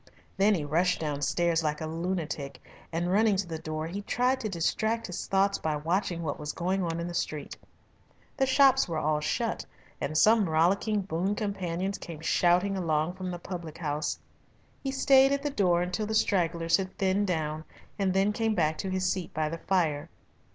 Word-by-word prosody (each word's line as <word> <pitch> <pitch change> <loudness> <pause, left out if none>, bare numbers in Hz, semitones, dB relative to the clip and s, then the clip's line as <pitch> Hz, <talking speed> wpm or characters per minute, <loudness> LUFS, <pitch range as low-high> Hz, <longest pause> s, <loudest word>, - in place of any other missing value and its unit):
Then 200 +2 +4
he 155 -5 -2
rushed 170 +5 +1
downstairs 160 +3 0
like 150 -1 -1
a 160 - -4
lunatic, 160 -3 -3 0.3
and 170 +2 -1
running 210 +1 +4
to 190 0 -1
the 160 -2 -5
door 155 0 -4
he 185 +5 -4
tried 250 +5 +1
to 220 -4 -3
distract 220 +6 0
his 180 - -5
thoughts 195 +1 +2
by 155 -1 -1
watching 170 +3 -1
what; 145 -3 -3
was 150 0 -4
going 185 +3 -1
on 165 -2 -2
in 170 - -3
the 175 - -5
street. 150 -4 -3 0.8
The 265 -1 +2
shops 265 0 +5
were 165 - -2
all 155 0 +1
shut, 150 - -1 0.4
and 155 +2 -1
some 215 0 +5
rollicking 195 +6 +2
boon 190 +2 -1
companions 195 -2 -2
came 160 -3 -8
shouting 180 +4 +2
along 160 -2 0
from 185 0 -5
the 175 - -4
public 170 -3 -7
house. 155 -1 -2 0.7
He 270 - -1
stayed 270 0 +5
at 280 0 -1
the 290 - -1
door 175 -7 +2
until 195 +4 -2
the 220 - -2
stragglers 170 -5 +2
had 190 -1 -5
thinned 195 +1 +1
down, 155 -3 -2 0.4
and 195 -1 +2
then 195 +2 +2
came 225 0 0
back 155 -4 +1
to 190 - -3
his 185 0 -1
seat 185 -2 -1
by 155 -1 0
the 165 +1 -5
fire. 165 -7 0
180 Hz, 190 wpm, -28 LUFS, 160-200 Hz, 0.8 s, shops